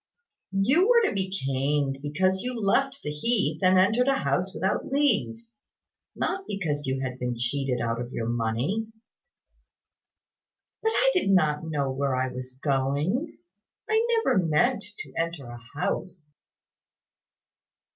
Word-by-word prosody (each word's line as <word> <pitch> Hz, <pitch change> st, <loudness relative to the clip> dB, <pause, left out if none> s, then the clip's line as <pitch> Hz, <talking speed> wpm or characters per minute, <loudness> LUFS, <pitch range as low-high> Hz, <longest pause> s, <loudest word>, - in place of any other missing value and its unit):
"You 270 Hz, -, +4 dB
were 470 Hz, -3 st, +5 dB
to -, -, -2 dB
be 190 Hz, -1 st, -1 dB
caned 135 Hz, -4 st, -1 dB
because 185 Hz, +6 st, 0 dB
you 250 Hz, -1 st, -3 dB
left 270 Hz, +7 st, +1 dB
the 150 Hz, -, -3 dB
heath 155 Hz, -1 st, 0 dB
and 185 Hz, 0 st, +5 dB
entered 220 Hz, +7 st, +3 dB
a 275 Hz, -, +4 dB
house 190 Hz, -8 st, 0 dB
without 190 Hz, 0 st, -1 dB
leave 245 Hz, -5 st, +1 dB, 0.7 s
not 385 Hz, +1 st, -2 dB
because 150 Hz, -8 st, -2 dB
you 130 Hz, 0 st, -1 dB
had 130 Hz, -1 st, -4 dB
been 125 Hz, -1 st, -2 dB
cheated 125 Hz, +1 st, -1 dB
of 120 Hz, +1 st, -3 dB
your 115 Hz, -2 st, -3 dB
money." 120 Hz, -, -1 dB, 1.9 s
"But 445 Hz, -, +2 dB
I -, -, +4 dB
did 365 Hz, -, +1 dB
not 155 Hz, -5 st, +3 dB
know 140 Hz, -4 st, -1 dB
where 135 Hz, 0 st, 0 dB
I 130 Hz, 0 st, -1 dB
was 130 Hz, 0 st, -8 dB
going. 145 Hz, -, 0 dB, 0.5 s
I 440 Hz, +1 st, +3 dB, 0.2 s
never 190 Hz, -, +3 dB
meant 200 Hz, +8 st, +2 dB, 0.2 s
to 135 Hz, -, -11 dB
enter 165 Hz, -4 st, -2 dB
a 120 Hz, 0 st, -9 dB, 0.2 s
house." 175 Hz, -4 st, -3 dB
160 Hz, 135 wpm, -26 LUFS, 135-220 Hz, 1.9 s, were